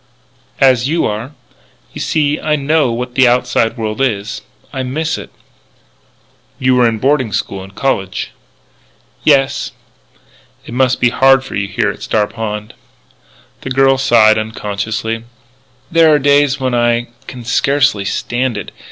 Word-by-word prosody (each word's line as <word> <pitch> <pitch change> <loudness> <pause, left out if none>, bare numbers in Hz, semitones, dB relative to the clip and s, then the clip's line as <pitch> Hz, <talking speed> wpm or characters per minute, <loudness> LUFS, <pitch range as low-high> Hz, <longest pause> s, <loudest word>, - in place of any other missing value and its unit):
"As 130 -2 +4
you 165 +2 +1
are. 110 +7 -4 0.6
You - - -6
see 150 -2 0
I 155 -1 0
know 150 -2 +1
what 125 +1 -4
the 130 -1 +4
outside 120 -1 +1
world 110 +1 -3
is. 110 -5 -1 0.3
I 135 - -3
miss 155 +5 -2
it." - - -8 1.3
"You 130 0 +2
were 125 -1 +4
in 110 - -3
boarding 130 -1 +1
school 100 -1 -3
and 95 0 -14
college." 95 -9 -2 0.9
"Yes." 140 -1 +2 0.9
"It - - -9
must 130 0 +2
be 120 - +4
hard 135 +2 +4
for 135 - -9
you 100 -1 -1
here 100 - 0
at - - -12
Star 105 -1 +1
Pond." 105 -1 -5 0.9
The - - -6
girl 135 0 +3
sighed, 110 -5 +4
unconsciously: 110 +1 -3 0.7
"There 165 -1 +5
are 150 - +5
days 145 0 +3
when 130 -1 -1
I 120 0 +1 0.2
can 125 -3 -9
scarcely 135 -2 +2
stand 120 +4 -2
it.... 100 - -6
125 Hz, 145 wpm, -15 LUFS, 110-135 Hz, 1.3 s, There